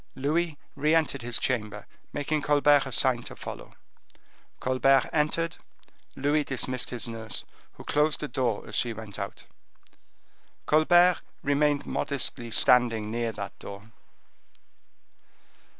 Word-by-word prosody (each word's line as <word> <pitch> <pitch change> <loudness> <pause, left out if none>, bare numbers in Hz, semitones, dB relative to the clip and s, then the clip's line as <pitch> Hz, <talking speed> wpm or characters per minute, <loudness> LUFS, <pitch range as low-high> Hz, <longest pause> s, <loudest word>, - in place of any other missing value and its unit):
Louis 155 +3 0 0.2
re 150 +3 +2
entered 150 -5 +1
his 120 0 0
chamber, 105 -5 -2 0.3
making 145 +1 -1
Colbert 145 -1 +4
a - - -6
sign 120 +1 +3
to - - -9
follow. - - -9 0.8
Colbert 130 +1 +3
entered; 160 +2 0 0.6
Louis 145 +2 +1
dismissed 130 -2 -2
the 120 -1 -3
nurse, 110 -1 -4 0.3
who - - -12
closed 150 +1 +1
the 150 - -3
door 120 -7 -1
as 110 - -10
she 120 +1 0
went 105 -2 -8
out. 100 - -6 1.2
Colbert 175 +4 +5 0.2
remained 145 0 +2
modestly 120 -3 -2
standing 115 -2 +3
near 115 0 -1
that 100 -2 -7
door. 100 +3 -10
130 Hz, 120 wpm, -27 LUFS, 115-150 Hz, 1.2 s, Colbert